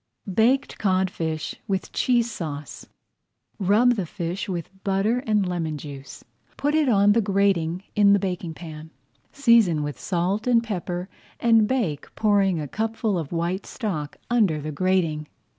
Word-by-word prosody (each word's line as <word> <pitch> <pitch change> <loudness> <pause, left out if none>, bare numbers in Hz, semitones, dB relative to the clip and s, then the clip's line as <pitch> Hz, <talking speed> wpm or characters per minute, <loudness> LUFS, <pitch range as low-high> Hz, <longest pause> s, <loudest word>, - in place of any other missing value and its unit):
BAKED 250 +7 +2
CODFISH 185 -5 -1
WITH 190 -2 -2
CHEESE 240 -2 +1
SAUCE 150 -7 -6 0.7
Rub 210 +6 +4
the 195 -7 -3
fish 175 +3 -4
with 175 -2 -4
butter 200 +5 +1
and 210 -3 +2
lemon 165 -4 -2
juice, 140 -1 -9 0.3
put 290 +1 0
it 305 -3 +3
on 205 -2 +5
the 230 +2 +4
grating 195 -4 +1
in 200 -1 +6
the - - +5
baking 180 -4 -3
pan, 160 -2 -9 0.4
season 230 - +4
with 145 -1 -5
salt 190 +5 -1
and 235 -2 +4
pepper, 180 -4 -4 0.3
and 225 -2 +4
bake, 205 - -1
pouring 200 -5 +2
a 150 - -4
cupful 220 - -1
of 160 -5 -3
white 170 +3 -2
stock 170 - -4
under 205 -10 +3
the 155 +1 -5
grating. 165 -2 0
190 Hz, 145 wpm, -24 LUFS, 165-220 Hz, 0.7 s, in